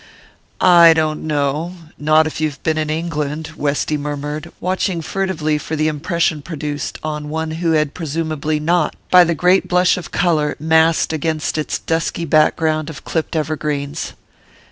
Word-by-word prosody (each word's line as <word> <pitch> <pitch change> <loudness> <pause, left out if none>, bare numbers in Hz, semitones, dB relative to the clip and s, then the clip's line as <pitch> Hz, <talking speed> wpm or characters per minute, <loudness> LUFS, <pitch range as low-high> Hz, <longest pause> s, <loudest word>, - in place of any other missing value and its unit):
"I 170 -2 +7
don't 155 -1 -1
know 150 +4 -1 0.2
not 155 +1 +3
if 155 0 -4
you've 150 -3 -2
been 155 -1 +1
in 155 -1 -2
England," 155 -1 -3
Westy 145 +1 -1
murmured, 145 +1 -5
watching 185 -1 -1
furtively 160 -5 -1
for 160 - -4
the 155 0 +1
impression 155 +1 0
produced, 150 -2 -5
on 150 -1 -4
one 160 +1 -3
who 165 -2 +2
had 150 -2 +1
presumably 155 -2 -2
not, 165 0 +1 0.2
by 180 -1 +8
the 170 -1 0
great 180 +4 +3
blush 180 +1 +3
of 180 - -7
colour 155 -5 +1
massed 160 +1 +3
against 155 0 -1
its 155 -1 -1
dusky 165 +1 -2
background 155 0 +2
of 155 -1 -10
clipped 160 0 -2
evergreens. 150 -1 -2
155 Hz, 150 wpm, -18 LUFS, 150-165 Hz, 0.2 s, by